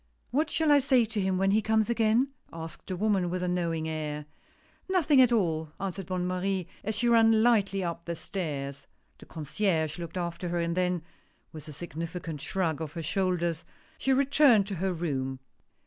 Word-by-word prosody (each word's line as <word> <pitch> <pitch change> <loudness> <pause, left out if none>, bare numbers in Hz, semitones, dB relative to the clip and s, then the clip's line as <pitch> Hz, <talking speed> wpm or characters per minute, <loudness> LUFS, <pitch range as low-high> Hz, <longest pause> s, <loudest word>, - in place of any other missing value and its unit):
"What 300 +5 +1
shall 315 -2 +2
I 290 - +7
say 255 -3 +3
to 215 -1 -2
him 190 -1 +1
when 195 +1 +2
he 215 +2 +3
comes 220 0 +2
again?" 230 +2 +2 0.2
asked 165 -1 -8
the 185 - -3
woman, 195 -3 +1
with 180 +1 -2
a - - 0
knowing 170 -3 -1
air. 150 -2 -4 0.3
" - - -34 0.3
Nothing 315 -7 +4
at 250 -2 +5
all," 160 -8 0
answered 190 -1 -4
Bonne 185 -1 -1
Marie, 185 0 -1 0.2
as 215 +1 -2
she 240 +3 +1
ran 225 -1 +5
lightly 200 -5 +3
up 170 -1 -4
the 170 - -3
stairs. 140 -5 -5 0.3
The - - -14
Concierge 160 0 -1
looked 170 +1 -6
after 175 0 -3
her, 175 0 -1
and 170 0 -1
then 180 -2 0 0.5
with 155 -1 -9
a - - -7
significant 165 0 -6
shrug 165 -4 -1
of 155 -2 -5
her 165 -1 -5
shoulders, 175 -2 0 0.4
she 270 - +1
returned 270 -5 +5
to 195 - -3
her 190 0 +1
room. 135 -6 -2
180 Hz, 190 wpm, -28 LUFS, 165-215 Hz, 0.5 s, I